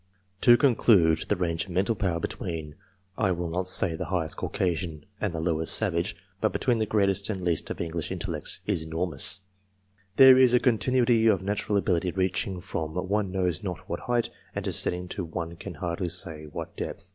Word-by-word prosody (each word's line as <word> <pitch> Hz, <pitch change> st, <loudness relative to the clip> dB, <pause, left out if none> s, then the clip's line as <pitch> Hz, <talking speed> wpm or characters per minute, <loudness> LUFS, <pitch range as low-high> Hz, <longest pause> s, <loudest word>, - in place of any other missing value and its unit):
<yTo 120 Hz, -1 st, +7 dB
conclude, 105 Hz, -, +4 dB
the -, -, +3 dB
range 85 Hz, -1 st, -1 dB
of -, -, -15 dB
mental 95 Hz, +6 st, +1 dB
power 90 Hz, -5 st, -1 dB
between 80 Hz, -2 st, -5 dB, 0.5 s
I 95 Hz, -4 st, +2 dB
will 85 Hz, -1 st, -2 dB
not 90 Hz, +2 st, -1 dB
say 90 Hz, -2 st, +3 dB
the 90 Hz, -, -4 dB
highest 80 Hz, -2 st, -1 dB
Caucasian 85 Hz, -4 st, -2 dB
and 105 Hz, -, -1 dB
the 85 Hz, -, -4 dB
lowest 80 Hz, -1 st, 0 dB
savage 85 Hz, -5 st, 0 dB, 0.2 s
but 110 Hz, -, +1 dB
between 120 Hz, -3 st, +1 dB
the 110 Hz, -, 0 dB
greatest 100 Hz, -1 st, +1 dB
and 100 Hz, -3 st, -3 dB
least 85 Hz, -3 st, 0 dB
of -, -, -5 dB
English 85 Hz, -1 st, -3 dB
intellects, -, -, -3 dB
is 80 Hz, -, 0 dB
enormous/> 85 Hz, +4 st, -1 dB, 0.7 s
There 130 Hz, +1 st, +9 dB
is 125 Hz, -2 st, +6 dB
a -, -, +5 dB
continuity 120 Hz, -1 st, +3 dB
of 100 Hz, -4 st, +3 dB
natural 105 Hz, +1 st, 0 dB
ability 90 Hz, -3 st, +1 dB
reaching 95 Hz, 0 st, -1 dB
from 80 Hz, -1 st, -4 dB
one 100 Hz, +2 st, -1 dB
knows 90 Hz, -4 st, 0 dB
not 90 Hz, -5 st, -6 dB
what 85 Hz, -, -3 dB
height, 120 Hz, -1 st, -1 dB, 0.2 s
and -, -, -3 dB
descending 90 Hz, 0 st, -1 dB
to 95 Hz, -, -4 dB
one 85 Hz, 0 st, -5 dB
can 90 Hz, +1 st, -8 dB
hardly 85 Hz, +3 st, -3 dB
say 80 Hz, -3 st, -2 dB
what 75 Hz, -, -7 dB
depth. -, -, -6 dB
90 Hz, 185 wpm, -27 LUFS, 85-105 Hz, 0.7 s, There